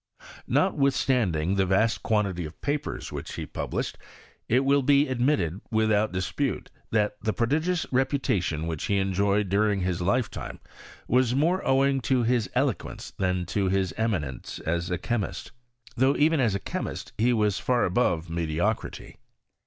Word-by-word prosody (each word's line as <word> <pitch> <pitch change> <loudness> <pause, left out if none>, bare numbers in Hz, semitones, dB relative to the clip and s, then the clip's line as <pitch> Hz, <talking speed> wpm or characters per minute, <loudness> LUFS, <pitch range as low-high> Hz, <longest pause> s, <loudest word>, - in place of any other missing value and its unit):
Notwithstanding 120 - +2
the 95 - +3
vast 110 +4 +2
quantity 100 -5 0
of 80 0 -9
papers 145 0 -3
which - - -6
he - - -4
published, - - -4 0.5
it 125 +4 +4
will 140 +1 +4
be 140 +2 +4
admitted, 120 - 0
without 110 -1 +2
dispute, 90 -1 -2 0.2
that 105 -1 +1
the 110 0 -1
prodip:ious 160 +9 +1
reputation 125 - 0
which 80 -2 -3
he 100 - +1
enjoyed 100 +1 +1
during 100 +1 +2
his 90 -1 -1
lifetime 105 +5 -1 0.5
was 125 0 +2
more 170 +7 +2
owing 135 0 +3
to 130 -1 +1
bis 120 -2 +1
eloquen<» - - -2
than 90 -2 0
to 95 +1 0
bis 95 -1 0
eminence 85 - -2
as 85 +2 -1
a 90 - 0
chemist 110 +3 -3 0.2
— 120 -1 -24
though 130 +3 +3
even 155 +1 +3
u 125 - +3
a 100 -2 0
chemist - - -5
he 120 +3 +4
was 105 -4 +1
far 125 -1 +1
above 90 -4 +1
mediocrity. 85 +5 -2
110 Hz, 150 wpm, -26 LUFS, 90-130 Hz, 0.5 s, it